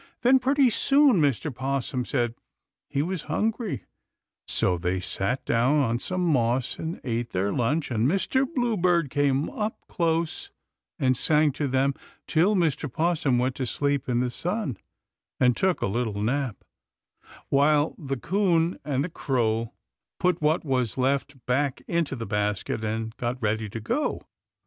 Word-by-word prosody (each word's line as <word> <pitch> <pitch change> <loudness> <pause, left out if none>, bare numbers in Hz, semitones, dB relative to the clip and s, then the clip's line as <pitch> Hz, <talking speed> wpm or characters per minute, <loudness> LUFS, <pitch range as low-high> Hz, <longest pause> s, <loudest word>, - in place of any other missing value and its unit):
Then, 260 +2 +6
pretty 265 0 +3
soon, 275 - +4
Mr. 145 0 +1
'Possum 130 0 -2
said 120 -3 0 0.6
he 140 - 0
was 180 0 -4
hungry, 215 - -1 0.6
so 90 -1 +1
they 90 +2 -1
sat 95 +6 -2
down 120 +5 +2
on 120 -5 +1
some 180 +6 -1
moss 125 -5 +1
and 160 +2 -4
ate 120 -1 -3
their 100 +2 0
lunch, 140 +5 0
and 115 +1 +2
Mr. 255 - +1
Bluebird 180 - +1
came 145 0 +1
up 220 -3 -3
close 170 - -1 0.5
and 130 -5 +2
sang 150 +3 +3
to 145 +1 -2
them 135 +1 +2 0.3
till 180 +6 +3
Mr. 155 -6 0
'Possum 155 -5 +1
went 125 +1 +1
to 130 - -2
sleep 140 +3 -1
in 120 0 +2
the 125 -1 -1
sun 170 - -3 0.6
and 125 -2 +4
took 190 -2 +1
a - - +3
little 110 0 -1
nap, 125 +1 -1 0.9
while 145 +2 +3
the 135 -3 -3
'Coon 175 +1 +1
and 140 -2 0
the 175 - -3
Crow 115 -7 -1 0.5
put 180 -2 +1
what 155 +2 +1
was 125 -5 0
left 135 0 -1
back 135 +2 0
into 170 -5 0
the 115 -2 -5
basket 105 +1 -1
and 110 +1 -3
got 125 +1 -2
ready 110 -1 -1
to 115 - -5
go. 250 - -1
140 Hz, 155 wpm, -26 LUFS, 120-170 Hz, 0.9 s, Then